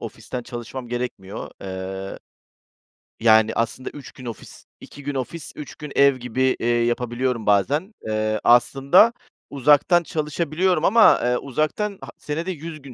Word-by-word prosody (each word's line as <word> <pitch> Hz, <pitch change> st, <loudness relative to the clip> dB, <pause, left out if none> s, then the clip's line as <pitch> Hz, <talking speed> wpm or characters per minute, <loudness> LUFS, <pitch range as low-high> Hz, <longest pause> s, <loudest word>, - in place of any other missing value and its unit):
ofisten 115 Hz, +2 st, -7 dB
çalışmam 120 Hz, +1 st, -7 dB
gerekmiyor. 120 Hz, -5 st, -5 dB
Eee, 95 Hz, 0 st, -6 dB, 1.0 s
yani 110 Hz, -1 st, +5 dB
aslında 115 Hz, +3 st, -2 dB
3 145 Hz, -, -11 dB
gün 130 Hz, -, -13 dB
ofis, 115 Hz, -4 st, -9 dB
2 145 Hz, -, -12 dB
gün 145 Hz, 0 st, -4 dB
ofis, 140 Hz, +4 st, -5 dB
3 150 Hz, -, -9 dB
gün 150 Hz, -1 st, -9 dB
ev 140 Hz, -1 st, +5 dB
gibi, 130 Hz, +1 st, 0 dB
eee, 115 Hz, -, -2 dB
yapabiliyorum 120 Hz, 0 st, 0 dB
bazen. 140 Hz, -, +1 dB
Eee, 110 Hz, 0 st, -1 dB
aslında 135 Hz, -, +5 dB, 0.4 s
uzaktan 150 Hz, +6 st, +4 dB
çalışabiliyorum 160 Hz, +3 st, -1 dB
ama, 225 Hz, +2 st, +6 dB
eee, 125 Hz, 0 st, +2 dB
uzaktan 155 Hz, -, -2 dB
ha -, -, -9 dB
senede 165 Hz, +5 st, -4 dB
100 160 Hz, -2 st, -8 dB
gün 135 Hz, -2 st, -11 dB
130 Hz, 140 wpm, -22 LUFS, 115-150 Hz, 1.0 s, ama